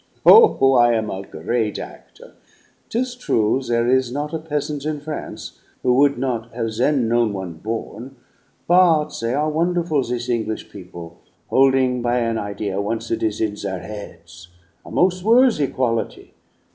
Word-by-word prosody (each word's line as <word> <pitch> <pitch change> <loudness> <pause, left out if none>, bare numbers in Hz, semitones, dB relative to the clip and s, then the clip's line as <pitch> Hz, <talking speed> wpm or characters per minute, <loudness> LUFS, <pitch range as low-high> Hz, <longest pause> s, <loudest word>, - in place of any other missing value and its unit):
Oh, 440 - +7
I 120 -1 +5
am 110 -2 -1
a 95 - -5
great 105 +5 -3
actor! - - -11 0.6
'Tis 245 +2 -2
true 125 - 0
there 120 -2 0
is 130 -1 +2
not 145 +4 -4
a 160 - -2
peasant 150 -2 -4
in 155 -1 -3
France 150 +1 -7 0.2
who 125 - +3
would 140 +2 +3
not 120 -3 -3
have 115 -2 -2
then 130 -2 +2
known 115 -2 +1
one 95 -3 -5
'born'; 115 +7 -6 0.5
but 165 -4 +4
they 115 +2 -1
are 150 +2 0
wonderful, 170 -2 0
this 120 -1 -4
English 110 -3 -3
people, 85 -3 -11 0.3
holding 130 -2 +3
by 120 +1 0
an 115 -2 0
idea 100 -1 -3
once 115 +2 -4
it - - -1
is 110 -1 -1
in 110 -2 0
their 95 -3 -4
heads 85 -3 -10 0.4
a - - -12
mos' 185 0 +1
worthy 230 - +4
quality. 120 -4 -3
120 Hz, 160 wpm, -21 LUFS, 110-150 Hz, 0.6 s, Oh